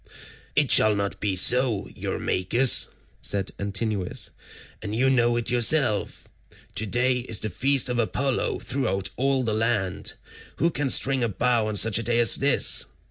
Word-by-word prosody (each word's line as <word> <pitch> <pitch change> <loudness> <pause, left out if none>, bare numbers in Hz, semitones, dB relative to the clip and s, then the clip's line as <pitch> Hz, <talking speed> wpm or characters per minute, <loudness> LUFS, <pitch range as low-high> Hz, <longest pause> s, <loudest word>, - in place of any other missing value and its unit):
"It 145 -3 +2
shall 110 -1 +6
not 100 0 -4
be 100 -2 -2
so, 120 +2 +2
Eurymachus," 115 +8 +1 0.3
said 100 -1 -3
Antinous, 100 -1 -3 0.5
"and 105 +1 -5
you 130 +3 +2
know 120 -2 +2
it 120 0 -1
yourself. 120 -3 +1 0.5
Today 120 +5 0
is 115 -3 0
the 110 - -4
feast 135 +7 +1
of 125 -1 -2
Apollo 130 +3 -1
throughout 100 -8 -3
all 135 0 0
the 110 -3 -2
land; 105 -4 -2 0.4
who 170 - 0
can 145 -3 -2
string 135 0 +4
a 115 - 0
bow 115 +2 0
on 110 - -4
such 110 +1 +3
a - - -4
day 120 0 0
as 120 -4 +5
this? - - +2
115 Hz, 155 wpm, -24 LUFS, 105-130 Hz, 0.5 s, shall